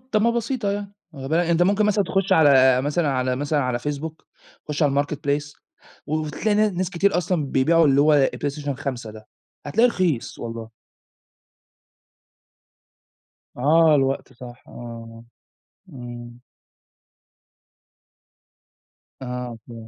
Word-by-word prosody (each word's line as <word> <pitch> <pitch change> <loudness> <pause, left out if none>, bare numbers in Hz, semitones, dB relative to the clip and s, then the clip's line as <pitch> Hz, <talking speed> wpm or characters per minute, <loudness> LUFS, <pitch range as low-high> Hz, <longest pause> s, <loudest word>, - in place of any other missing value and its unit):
طَب 215 0 +2
ما 235 - +3
بسيطة 235 -2 -2
يعني، 200 0 -4 0.2
آآ 135 -1 -7
با 170 +3 +1
أنت 170 +1 +3
ممكن 205 +3 +2
مثلًا 205 -1 +2
تخُش 195 +2 0
على 130 -6 +5
مثلًا 150 +2 0
على 130 -1 0
مثلًا 145 +1 0
على 125 -2 -1
Facebook، 150 +4 -4 0.6
خُش 150 +1 -2
على 145 -2 +3
الMarketplace 145 0 -3 0.5
و 150 - -2
وتلاقي 155 +7 -1
نا 215 0 +3
ناس 185 0 -3
كتير 195 +1 +1
أصلًا 175 -3 -1
بيبيعوا 160 +5 +3
اللي 140 0 +4
هو 145 -2 +4
PlayStation 145 0 -3
5 130 -5 -5
ده، 110 0 -13 0.4
هتلاقيه 230 +12 +3
رخيص 175 - -1
والله. 115 -1 -7 2.9
آه 155 +4 +4
الوقت 135 -1 0
صح، 125 -1 -12
آه. 115 -1 -10 0.7
إمم. 120 -4 -10 2.8
آه، 125 -2 -5
ف 120 - -10
145 Hz, 125 wpm, -22 LUFS, 125-175 Hz, 2.9 s, على